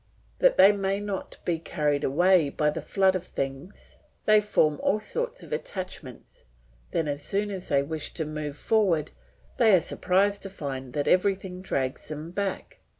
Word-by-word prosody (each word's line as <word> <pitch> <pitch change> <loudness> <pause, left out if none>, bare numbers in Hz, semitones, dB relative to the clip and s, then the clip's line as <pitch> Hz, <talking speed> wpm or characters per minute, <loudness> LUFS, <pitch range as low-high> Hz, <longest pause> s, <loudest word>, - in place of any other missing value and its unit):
That - - +4
they 200 - +8
may 195 -1 -1
not 205 -2 -5
be 170 -2 0
carried 150 -3 -1
away 175 +2 +4
by 150 +1 +1
the - - -5
flood 190 -1 +2
of 185 - -2
things, 135 +3 -6 0.3
they 215 0 +6
form 155 -8 +2
all 215 - +2
sorts 485 - -3
of - - -7
attachments; 180 - -7 0.4
then 160 - -1
as 145 0 -3
soon 205 +6 -1
as 190 -2 -5
they 140 -1 +3
wish 155 +1 -3
to 160 - -2
move 150 -1 -5
forward 185 -9 +1 0.5
they 220 -5 +6
are - - +5
surprised 200 +4 +1
to 195 - -5
find 135 -8 -6
that 145 -1 -1
everything 185 -1 +1
drags 135 -8 -2
them 155 +2 -6
back. 200 - -4
180 Hz, 170 wpm, -27 LUFS, 150-200 Hz, 0.5 s, they